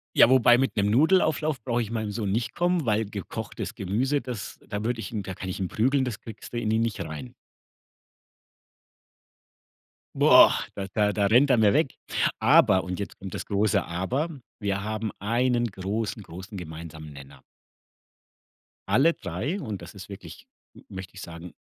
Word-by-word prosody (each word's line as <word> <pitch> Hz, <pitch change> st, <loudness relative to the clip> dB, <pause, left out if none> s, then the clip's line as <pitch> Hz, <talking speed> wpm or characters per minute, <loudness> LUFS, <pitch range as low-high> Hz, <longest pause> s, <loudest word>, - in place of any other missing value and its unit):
Ja, -, -, +8 dB
wobei 120 Hz, -2 st, +6 dB
mit 135 Hz, +1 st, 0 dB
'nem 100 Hz, 0 st, +2 dB
Nudelauflauf 155 Hz, -, +3 dB
brauche 120 Hz, -2 st, 0 dB
ich 110 Hz, -, -8 dB
meinem 110 Hz, -2 st, -2 dB
Sohn 100 Hz, -2 st, -2 dB
nicht 115 Hz, +3 st, -2 dB
kommen, 175 Hz, -4 st, +1 dB
weil 110 Hz, 0 st, +1 dB
gekochtes 100 Hz, -2 st, -6 dB
Gemüse, 125 Hz, +10 st, 0 dB
das 120 Hz, -4 st, -6 dB
da 105 Hz, -1 st, -4 dB
würde 120 Hz, 0 st, -1 dB
ich -, -, -6 dB
ihn 105 Hz, -3 st, -3 dB
da 95 Hz, -1 st, -6 dB
kann 95 Hz, -, -6 dB
ich 95 Hz, -, -4 dB
ihn 95 Hz, -, -1 dB
prügeln, 130 Hz, +7 st, +1 dB
das 120 Hz, -4 st, -4 dB
kriegst 110 Hz, -2 st, -10 dB
du 120 Hz, -, -4 dB
in 110 Hz, -2 st, -1 dB
ihn 110 Hz, +1 st, +2 dB
nicht 115 Hz, -3 st, -1 dB
rein. 70 Hz, -5 st, -8 dB, 2.8 s
Boah. -, -, +6 dB
Da 95 Hz, -1 st, -4 dB
da 105 Hz, -1 st, +2 dB
da 100 Hz, -2 st, +1 dB
rennt 125 Hz, +7 st, +5 dB
er 125 Hz, -, +5 dB
mir 105 Hz, -2 st, +4 dB
weg. 145 Hz, -3 st, +2 dB, 0.5 s
Aber 110 Hz, -, +5 dB
und 90 Hz, +1 st, -5 dB
jetzt 100 Hz, -, -6 dB
kommt 95 Hz, -2 st, -8 dB
das -, -, -5 dB
große 105 Hz, +1 st, +1 dB
Aber, 120 Hz, -, -2 dB, 0.3 s
wir 100 Hz, -2 st, -1 dB
haben 110 Hz, -1 st, -3 dB
einen 120 Hz, +3 st, +1 dB
großen, 105 Hz, +2 st, -3 dB
großen 95 Hz, +4 st, -9 dB
gemeinsamen 80 Hz, -2 st, -8 dB
Nenner. 70 Hz, 0 st, -13 dB, 1.5 s
Alle 165 Hz, +6 st, +4 dB
3 110 Hz, -, -4 dB
und 105 Hz, -9 st, -5 dB
das 85 Hz, -, -10 dB
ist 100 Hz, 0 st, -11 dB
wirklich 100 Hz, -, -10 dB, 0.3 s
m -, -, -16 dB
möchte 95 Hz, -1 st, -8 dB
ich 95 Hz, -, -10 dB
sagen 85 Hz, +1 st, -9 dB
105 Hz, 175 wpm, -26 LUFS, 95-120 Hz, 2.8 s, Ja